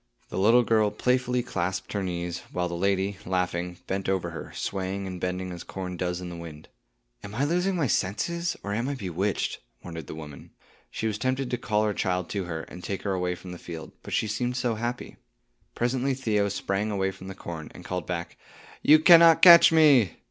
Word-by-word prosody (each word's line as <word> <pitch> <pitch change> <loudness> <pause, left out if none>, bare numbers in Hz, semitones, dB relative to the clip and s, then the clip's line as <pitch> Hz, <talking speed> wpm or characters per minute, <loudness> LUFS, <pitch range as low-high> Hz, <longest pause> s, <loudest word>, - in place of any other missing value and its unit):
The - - -3
little 115 +5 +5
girl 110 -2 +3
playfully 125 +3 0
clasped 95 -5 -3
her 100 - -1
knees, 85 -2 -3
while 90 0 -1
the 85 - -6
lady, 95 +2 0
laughing, 90 -1 -2
bent 95 0 -2
over 95 -3 -1
her, 85 - -8
swaying 95 0 -3
and 90 -2 -6
bending 90 0 -3
as 85 -1 -7
corn 90 -1 -6
does 90 0 -2
in 90 -1 -6
the 85 - -7
wind. 80 -3 -10 0.5
"Am 100 +1 -8
I 135 - 0
losing 180 +5 +1
my 165 -5 +1
senses, 170 - -1
or 100 - -3
am 115 +5 -1
I 145 - -2
bewitched?" 95 -2 -2 0.2
wondered 80 -4 -7
the - - -7
mother. 75 -3 -10 0.4
She - - -4
was 110 -1 -1
tempted 130 0 -1
to 125 - 0
call 105 -3 +1
her 105 -1 +1
child 90 -3 -1
to 100 -3 -2
her, 80 -2 -4
and 90 +2 -11
take 100 -1 -4
her 100 - -1
away 90 -1 -1
from 90 +1 -10
the 90 - -8
field, 80 -2 -8
but - - -10
she - - +1
seemed 120 +4 -2
so 120 -2 0
happy. 120 +2 -4 0.6
Presently 130 +2 0
Theo 105 -6 0
sprang 100 +1 -2
away 95 -2 0
from 95 0 -11
the 95 - -7
corn, 80 -2 -7
and 90 - -11
called 90 -3 -4
back, 85 -1 -4 0.4
"You 155 - +7
cannot 165 0 +7
catch 170 -2 +10
me." 145 - +5
95 Hz, 205 wpm, -26 LUFS, 90-120 Hz, 0.6 s, catch